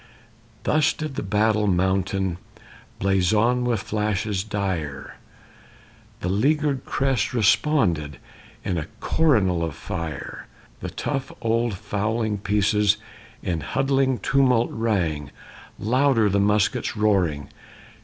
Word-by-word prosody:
Thus 155 Hz, +1 st, +3 dB
did 155 Hz, -3 st, -5 dB
the -, -, -3 dB
battle 105 Hz, +1 st, +1 dB
mountain 95 Hz, 0 st, 0 dB, 0.6 s
Blazon 105 Hz, +6 st, +2 dB
with 115 Hz, -5 st, 0 dB
flashes 105 Hz, -2 st, -1 dB
dire; 95 Hz, -10 st, -4 dB, 1.0 s
The -, -, -2 dB
leaguered 140 Hz, +6 st, +1 dB
crest 130 Hz, -4 st, 0 dB
responded 100 Hz, -, +2 dB, 0.5 s
In 90 Hz, -3 st, 0 dB
a 75 Hz, -, -5 dB
coronal 105 Hz, -, +2 dB
of 80 Hz, -4 st, -3 dB
fire. 80 Hz, -2 st, -6 dB, 0.3 s
The -, -, -5 dB
tough 135 Hz, -2 st, -3 dB
old 115 Hz, -1 st, 0 dB
fowling 105 Hz, +1 st, -2 dB
pieces 105 Hz, +1 st, +2 dB, 0.5 s
In 85 Hz, -4 st, -2 dB
huddling 135 Hz, -, +1 dB
tumult 125 Hz, +1 st, +2 dB
rang. 90 Hz, -11 st, -1 dB, 0.5 s
Louder 125 Hz, -1 st, +2 dB
the 100 Hz, +1 st, +2 dB
muskets' 105 Hz, +4 st, +1 dB
roaring! 90 Hz, -9 st, +1 dB
105 Hz, 105 wpm, -24 LUFS, 95-120 Hz, 1.0 s, Thus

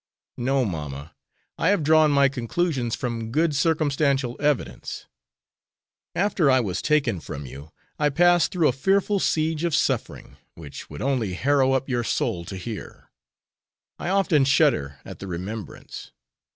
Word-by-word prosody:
"No, 130 Hz, +1 st, +1 dB
mamma; 75 Hz, -4 st, -6 dB, 0.5 s
I -, -, +1 dB
have 205 Hz, -6 st, +2 dB
drawn 155 Hz, +1 st, +5 dB
my 140 Hz, -1 st, +4 dB
conclusions 135 Hz, -1 st, -1 dB
from 115 Hz, -4 st, -4 dB
good 155 Hz, +2 st, +1 dB
circumstantial 140 Hz, -4 st, +1 dB
evidence. 145 Hz, -3 st, -2 dB, 1.1 s
After 180 Hz, -5 st, +2 dB
I 130 Hz, -1 st, +5 dB
was 95 Hz, -7 st, -2 dB
taken 140 Hz, -, +1 dB
from 70 Hz, -1 st, -7 dB
you, 70 Hz, +4 st, -10 dB, 0.3 s
I 150 Hz, -1 st, +3 dB
passed 175 Hz, +2 st, +4 dB
through 170 Hz, -4 st, +2 dB
a -, -, +4 dB
fearful 195 Hz, +8 st, +1 dB
siege 160 Hz, -2 st, 0 dB
of 170 Hz, -3 st, +1 dB
suffering, -, -, -2 dB, 0.2 s
which 75 Hz, -4 st, -10 dB
would -, -, -7 dB
only 125 Hz, -8 st, 0 dB
harrow 135 Hz, +5 st, +2 dB
up 135 Hz, 0 st, 0 dB
your 120 Hz, -3 st, -1 dB
soul 85 Hz, -6 st, -1 dB
to 95 Hz, -, -7 dB
hear. 105 Hz, +3 st, -8 dB, 0.9 s
I -, -, -3 dB
often 190 Hz, -7 st, +3 dB
shudder 135 Hz, -, +2 dB
at -, -, -9 dB
the 100 Hz, -, -7 dB
remembrance. 95 Hz, +5 st, -7 dB
135 Hz, 145 wpm, -24 LUFS, 110-155 Hz, 1.1 s, drawn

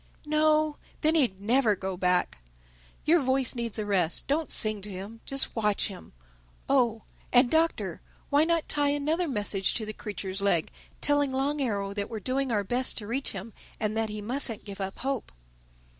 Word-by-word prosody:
"No. 305 Hz, 0 st, +2 dB, 0.2 s
Then 310 Hz, +1 st, +4 dB
he'd 250 Hz, -12 st, +2 dB
never 225 Hz, +1 st, +2 dB
go 190 Hz, 0 st, -4 dB
back. 180 Hz, -, +1 dB, 0.7 s
Your 335 Hz, +3 st, +5 dB
voice 260 Hz, -2 st, +2 dB
needs 235 Hz, -3 st, -2 dB
a 215 Hz, -, -2 dB
rest. 185 Hz, -5 st, +1 dB
Don't 305 Hz, +3 st, 0 dB
sing 215 Hz, -2 st, +4 dB
to 210 Hz, -, -7 dB
him: 200 Hz, +4 st, -8 dB
just 275 Hz, 0 st, 0 dB
watch 210 Hz, -2 st, +1 dB
him—Oh, 175 Hz, -, -3 dB, 0.3 s
and 245 Hz, 0 st, +5 dB
Doctor, 325 Hz, +1 st, +1 dB, 0.3 s
why 290 Hz, +2 st, +5 dB
not 335 Hz, 0 st, +1 dB
tie 290 Hz, -1 st, +2 dB
another 305 Hz, +5 st, 0 dB
message 205 Hz, -6 st, 0 dB
to 220 Hz, -, -2 dB
the 215 Hz, -, -5 dB
creature's 195 Hz, -2 st, -5 dB
leg, 175 Hz, -5 st, +1 dB, 0.3 s
telling 290 Hz, -1 st, +2 dB
Long 280 Hz, +3 st, 0 dB
Arrow 200 Hz, -6 st, -1 dB
that 200 Hz, 0 st, -3 dB
we're 225 Hz, -, -5 dB
doing 260 Hz, +4 st, -1 dB
our 205 Hz, -3 st, +1 dB
best 245 Hz, +6 st, 0 dB
to 210 Hz, -, -3 dB
reach 255 Hz, +6 st, -2 dB
him 200 Hz, +3 st, -7 dB, 0.3 s
and 215 Hz, 0 st, -1 dB
that 220 Hz, -1 st, 0 dB
he 210 Hz, 0 st, -5 dB
mustn't 240 Hz, -1 st, +1 dB
give 200 Hz, -1 st, -7 dB
up 195 Hz, 0 st, -4 dB
hope?" 270 Hz, -3 st, -3 dB
230 Hz, 175 wpm, -28 LUFS, 200-280 Hz, 0.7 s, Your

